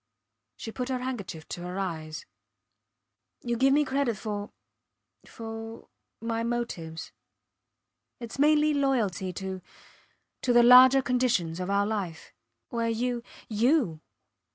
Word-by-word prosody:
She 225 - -6
put 250 +2 -4
her 260 - 0
handkerchief 225 -11 -5
to 175 - -5
her 180 +1 -5
eyes. 160 -5 -4 1.2
Youll 240 -1 -2
give 270 +1 +5
me 295 +2 +4
credit 265 -4 0
for 205 -1 -5 0.8
for 225 0 -8 0.3
my 230 0 -2
motives. 230 -9 -4 1.1
Its 235 +2 -8
mainly 300 +1 +4
loyalty 230 -10 0
to 190 0 -5 0.8
to 245 - +1
the 240 0 +7
larger 255 +2 +8
conditions 235 -10 0
of 180 +1 -3
our 200 0 +2
life 195 -7 -4 0.4
where 230 -3 -1
you 240 +1 -1 0.3
you! 225 - +1
230 Hz, 120 wpm, -28 LUFS, 190-250 Hz, 1.2 s, larger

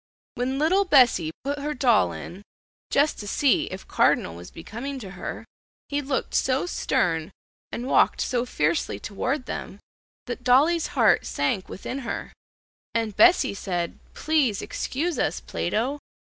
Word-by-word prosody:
When 260 +2 -2
little 345 +7 +3
Bessie 250 - +4
put 285 +2 -2
her 300 +1 -3
doll 245 -4 +3
in, 185 +3 -8 0.5
"just 290 +2 +2
to 205 - -6
see 270 +5 +2
if 190 +1 -8
cardinal 80 - +2
was 85 +1 -10
becoming 235 +11 -6
to 200 -7 -8
her," 190 - -6 0.4
he 285 0 0
looked 270 -1 -2
so 260 +3 +1
stern 165 - 0 0.4
and 240 - -4
walked - - +3
so 245 -2 0
fiercely 155 - -1
toward 255 - -3
them - - -6 0.5
that 245 0 -6
dolly's 300 +7 +4
heart 220 -7 +4
sank 145 +7 -1
within 255 +7 -5
her, 240 -4 -5 0.6
and 225 -3 -1
Bessie 345 - +5
said, 175 -4 -3 0.2
"Please 290 -10 +1
excuse 320 +5 -2
us, - - 0
Plato." 260 +7 -2
250 Hz, 145 wpm, -25 LUFS, 195-285 Hz, 0.6 s, Bessie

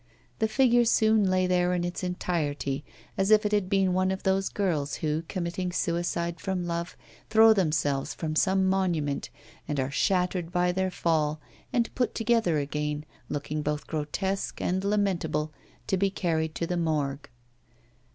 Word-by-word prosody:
The 220 - +2
figure 240 +2 +4
soon 220 -3 +3
lay 185 0 +2
there 180 0 +2
in 175 - -1
its 175 +1 -4
entirety, 150 -6 -2 0.4
as 195 +1 +2
if 215 0 +5
it 210 - +1
had 205 -3 +1
been 195 -2 +2
one 185 +1 +2
of 190 0 -3
those 195 0 +1
girls 155 -8 -1
who, 155 0 -1
committing 180 0 -3
suicide 170 -1 -1
from 185 -1 -2
love, 170 0 -3 0.3
throw 220 0 +7
themselves 150 -7 0
from 155 -2 -3
some 190 +2 +3
monument 175 -7 0 0.4
and 150 -2 -2
are 130 +1 -1
shattered 180 +1 0
by 180 -1 +2
their 190 +1 0
fall, 155 -4 0 0.3
and 235 -2 0
put 250 -2 -1
together 225 -8 +2
again, 150 +1 -2 0.2
looking 145 +1 -3
both 150 0 -2
grotesque 190 +6 -3
and 185 +1 -1
lamentable, 170 -7 0 0.3
to 190 - 0
be 195 +1 +2
carried 160 -4 -1
to 170 - -1
the 180 +1 -2
Morgue. 150 -4 -1
180 Hz, 160 wpm, -27 LUFS, 155-195 Hz, 0.4 s, throw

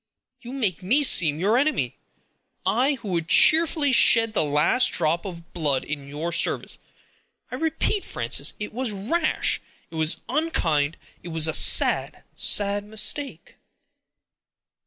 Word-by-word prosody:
You 245 +2 -10
make 210 -10 -2
me 250 +11 +2
seem 160 - +3
your 210 +7 +1
enemy; 305 +3 -1 0.7
I, 270 +4 +1
who 225 -5 -9
would 170 -3 -2
cheerfully 310 - +4
shed 230 -2 +4
the - - 0
last 150 - +2
drop 170 +2 -1
of 170 -2 -10
blood 145 -6 -1
in 145 -2 -6
your 150 +4 -5
service. - - 0 0.7
I - - -4
repeat, 325 +5 -1
Frances, - - -2
it 210 - -6
was 255 +1 -2
rash; 250 - -1 0.3
it - - -11
was 160 +1 0
unkind; 170 - -1 0.2
it - - -11
was 160 -1 0
a 160 - -2
sad, - - +3
sad 205 0 +1
mistake." 220 +7 -3
205 Hz, 135 wpm, -23 LUFS, 160-265 Hz, 0.7 s, cheerfully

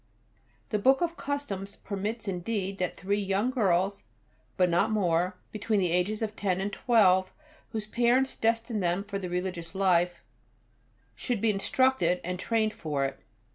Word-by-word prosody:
The 210 - 0
Book 265 +8 +4
of 340 -1 0
Customs 205 - -4
permits 210 +3 -4
indeed 195 +1 -2
that 180 -1 -2
three 200 +2 0
young 200 +5 0
girls, 195 -5 +1 0.6
but 180 - +4
not 175 +5 +2
more, 180 -3 +1
between 215 0 0
the 180 -3 +1
ages 195 +5 0
of 215 -1 -3
ten 190 -2 0
and 200 +2 -2
twelve, 190 -6 +4 0.4
whose 220 -2 -4
parents 245 +4 +2
destine 230 0 0
them 180 +1 0
for 200 -1 -4
the 185 -2 -5
Religious 180 -1 -4
life, 180 -2 +2 0.9
should 245 -4 -2
be 225 +1 +3
instructed 195 -3 +2
and 180 +1 -3
trained 220 +1 +1
for 145 -4 -2
it. 135 - -4
200 Hz, 155 wpm, -28 LUFS, 180-225 Hz, 0.9 s, Book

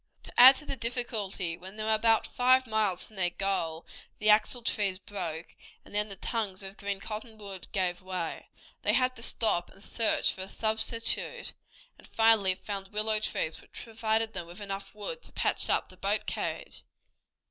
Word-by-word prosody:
To - - -8
add 260 +2 +10
to 300 - -8
the 275 - -2
difficulty, 225 -8 -1
when 190 +3 -10
they 215 - -3
were 220 0 +2
about 225 +1 +3
five 255 +1 +3
miles 215 -5 +1
from 215 - -13
their 180 -2 +2
goal 175 -4 -2 0.3
the 215 0 +4
axle 230 +3 +3
trees 200 -4 +1
broke, 175 -4 -6 0.3
and - - -16
then 210 +1 +1
the 195 - -5
tongues 200 -2 -3
of 195 0 -8
green 200 -1 -3
cottonwood 210 -3 -7
gave 180 -2 -1
way. 185 -3 -5 0.3
They - - +2
had 255 0 +2
to - - -7
stop 215 -7 +2
and 195 - -12
search 225 0 +2
for 190 - -8
a 190 - -4
substitute, 220 +2 0 0.5
and - - -15
finally 220 -4 +4
found 195 0 -5
willow 215 +1 +1
trees, 160 -6 -1
which - - -23
provided 225 -1 -1
them 175 -3 -5
with 175 +3 -11
enough 195 0 -6
wood 340 - -5
to - - -12
patch - - +1
up - - +1
the - - -15
boat - - -1
carriage. - - -4
210 Hz, 180 wpm, -29 LUFS, 190-225 Hz, 0.5 s, add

